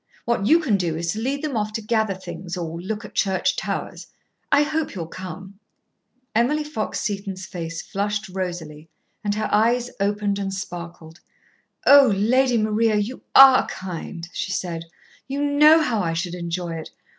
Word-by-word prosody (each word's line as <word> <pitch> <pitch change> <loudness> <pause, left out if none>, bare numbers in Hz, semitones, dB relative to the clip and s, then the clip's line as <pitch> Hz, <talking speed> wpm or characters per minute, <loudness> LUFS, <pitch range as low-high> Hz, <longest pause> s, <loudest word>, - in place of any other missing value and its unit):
What 235 -4 0
you 320 - +7
can 250 -12 +1
do 170 -4 -1
is 170 0 -1
to 215 - -4
lead 275 +5 -2
them 295 -4 -2
off 215 -1 -1
to 225 - -3
gather 220 -2 +1
things 175 -1 -7
or 170 -1 -5
look 210 +3 -4
at - - -11
church 190 -2 +1
towers. - - -4 0.4
I 285 +1 +5
hope 310 -2 -2
you'll 170 -3 -4
come." 190 +3 -9 0.7
Emily 255 +7 +2
Fox 295 -8 -3
Seton's 195 -2 -4
face 165 -3 -6
flushed 205 +2 -2
rosily, 175 -5 -5 0.3
and 205 -1 0
her 215 - -1
eyes 235 +3 +2
opened 200 0 0
and 195 -1 -2
sparkled. 170 -3 -7 0.7
"O 280 -1 +8
Lady 240 +5 +3
Maria, 215 0 +2
you 210 +5 -2
are 270 -1 +9
kind!" 175 -2 -6
she - - -3
said. 170 -3 -3 0.4
"You 280 +2 -2
know 300 +3 +6
how 230 -7 0
I 165 -3 -1
should 170 +1 -3
enjoy 170 -1 -4
it. 160 - -7
200 Hz, 170 wpm, -23 LUFS, 175-235 Hz, 0.7 s, are